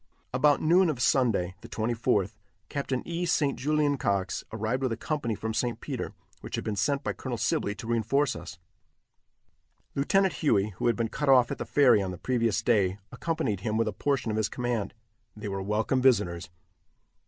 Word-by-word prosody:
About 145 Hz, +3 st, +3 dB
noon 175 Hz, +3 st, +5 dB
of 140 Hz, -6 st, -2 dB
Sunday, 115 Hz, -9 st, +2 dB
the -, -, -11 dB
24th, 110 Hz, -3 st, 0 dB, 0.4 s
Capt. 140 Hz, -2 st, -4 dB
E. 170 Hz, +1 st, -3 dB
St. 150 Hz, -5 st, +1 dB
Julien 150 Hz, 0 st, +1 dB
Cox 100 Hz, -3 st, -1 dB
arrived 110 Hz, +4 st, -2 dB
with 130 Hz, -2 st, 0 dB
a 115 Hz, -, -2 dB
company 120 Hz, -5 st, -2 dB
from 110 Hz, +2 st, -4 dB
St. 120 Hz, +1 st, -1 dB
Peter, -, -, -5 dB, 0.3 s
which -, -, -6 dB
had -, -, -3 dB
been 110 Hz, -, -2 dB
sent 140 Hz, +8 st, 0 dB
by -, -, -1 dB
Colonel 125 Hz, -3 st, -5 dB
Sibley 110 Hz, -2 st, 0 dB
to 105 Hz, -, -9 dB
reinforce 120 Hz, +5 st, +1 dB
us. 85 Hz, 0 st, -8 dB, 1.4 s
Lieutenant 190 Hz, +7 st, +2 dB
Huey, 110 Hz, -9 st, +1 dB
who -, -, 0 dB
had 120 Hz, -, +3 dB
been 115 Hz, +1 st, -1 dB
cut 145 Hz, +4 st, -2 dB
off 125 Hz, -3 st, +6 dB
at -, -, -4 dB
the -, -, -3 dB
ferry 125 Hz, -7 st, +5 dB
on 95 Hz, -, -2 dB
the 90 Hz, -, -6 dB
previous 115 Hz, -2 st, 0 dB
day, 100 Hz, -6 st, +2 dB
accompanied 130 Hz, -, -2 dB
him 105 Hz, +3 st, -2 dB
with 115 Hz, -, +1 dB
a -, -, -2 dB
portion 140 Hz, -5 st, -1 dB
of 105 Hz, -, -2 dB
his 110 Hz, -1 st, +1 dB
command. 120 Hz, -4 st, -2 dB, 0.4 s
They 105 Hz, 0 st, -6 dB
were 95 Hz, 0 st, -3 dB
welcome 105 Hz, +6 st, 0 dB
visitors. 100 Hz, -10 st, +2 dB
115 Hz, 190 wpm, -28 LUFS, 105-140 Hz, 1.4 s, off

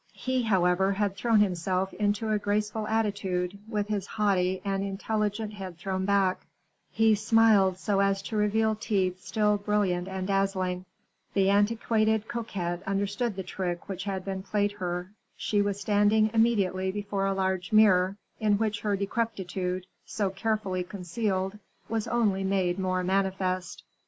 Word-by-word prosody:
He, 260 Hz, 0 st, -1 dB
however, 190 Hz, -3 st, +2 dB
had 200 Hz, -1 st, -1 dB
thrown 225 Hz, +1 st, +3 dB
himself 185 Hz, 0 st, 0 dB
into 210 Hz, +1 st, 0 dB
a 210 Hz, -, +2 dB
graceful 210 Hz, +1 st, -1 dB
attitude, 200 Hz, -4 st, -1 dB
with 210 Hz, -2 st, -1 dB
his 205 Hz, -2 st, -2 dB
haughty 190 Hz, -3 st, +1 dB
and 195 Hz, 0 st, 0 dB
intelligent 210 Hz, +2 st, -2 dB
head 190 Hz, -4 st, -7 dB
thrown 190 Hz, +2 st, -2 dB
back; 195 Hz, -2 st, +1 dB, 0.4 s
he 225 Hz, 0 st, +3 dB
smiled 215 Hz, -3 st, +4 dB
so 195 Hz, +1 st, 0 dB
as 195 Hz, 0 st, +2 dB
to 220 Hz, -, -5 dB
reveal 215 Hz, +1 st, +2 dB
teeth 190 Hz, -4 st, -1 dB
still 210 Hz, -1 st, +1 dB
brilliant 200 Hz, -4 st, 0 dB
and 190 Hz, -1 st, -4 dB
dazzling. 190 Hz, -2 st, 0 dB, 0.5 s
The 195 Hz, 0 st, +4 dB
antiquated 220 Hz, +1 st, +2 dB
coquette 180 Hz, -7 st, -3 dB
understood 205 Hz, +3 st, -1 dB
the 190 Hz, -, -4 dB
trick 175 Hz, -2 st, -4 dB
that 190 Hz, -2 st, -5 dB
had 190 Hz, -1 st, -4 dB
been 190 Hz, -1 st, -3 dB
played 205 Hz, +1 st, 0 dB
her. 180 Hz, -2 st, -4 dB, 0.3 s
She 205 Hz, -1 st, +1 dB
was 200 Hz, -1 st, -1 dB
standing 210 Hz, +1 st, +3 dB
immediately 195 Hz, -5 st, +2 dB
before 200 Hz, -1 st, -2 dB
a 195 Hz, -, +1 dB
large 190 Hz, -2 st, -1 dB
mirror, 195 Hz, -3 st, +5 dB, 0.2 s
in 210 Hz, -2 st, +3 dB
which 210 Hz, -1 st, -1 dB
her 205 Hz, -1 st, +1 dB
decrepitude, 190 Hz, -3 st, -2 dB, 0.2 s
so 200 Hz, -3 st, -2 dB
carefully 195 Hz, -3 st, -1 dB
concealed, 190 Hz, +1 st, -3 dB, 0.3 s
was 225 Hz, -1 st, -2 dB
only 210 Hz, -5 st, +1 dB
made 190 Hz, -2 st, 0 dB
more 185 Hz, -1 st, 0 dB
manifest. 190 Hz, -1 st, -1 dB
200 Hz, 145 wpm, -28 LUFS, 190-210 Hz, 0.5 s, mirror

